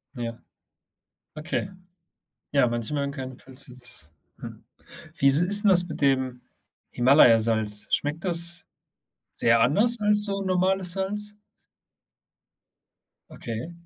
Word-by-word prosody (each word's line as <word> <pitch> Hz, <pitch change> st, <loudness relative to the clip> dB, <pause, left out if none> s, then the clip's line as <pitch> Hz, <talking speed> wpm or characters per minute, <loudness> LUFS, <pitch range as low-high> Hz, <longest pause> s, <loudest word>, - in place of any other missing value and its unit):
Ja. 115 Hz, -1 st, -6 dB, 1.0 s
Okay. 155 Hz, +5 st, -4 dB, 0.8 s
Ja, 140 Hz, -3 st, +2 dB
manche 120 Hz, +4 st, -4 dB
mögen 140 Hz, -1 st, -3 dB
kein 130 Hz, -2 st, -9 dB
falls 130 Hz, +1 st, -5 dB
dir 125 Hz, -, -14 dB
das 120 Hz, -12 st, -8 dB, 0.3 s
hm. -, -, -11 dB, 0.5 s
Wie 140 Hz, -, -1 dB
s 140 Hz, +3 st, +6 dB
ist 205 Hz, +4 st, +5 dB
'n -, -, +4 dB
das 180 Hz, -2 st, +4 dB
mit 155 Hz, -, -8 dB
dem 130 Hz, -3 st, -1 dB, 0.5 s
Himalayasalz? 115 Hz, -5 st, +3 dB
Schmeckt 150 Hz, +4 st, -2 dB
das 170 Hz, -1 st, +3 dB, 0.7 s
sehr 115 Hz, 0 st, +1 dB
anders 225 Hz, -, +2 dB
als 210 Hz, 0 st, +3 dB
so 200 Hz, -1 st, -1 dB
normales 185 Hz, -1 st, 0 dB
Salz? 210 Hz, +2 st, -4 dB, 2.0 s
Okay. 115 Hz, +8 st, -8 dB
145 Hz, 115 wpm, -24 LUFS, 125-185 Hz, 2.0 s, s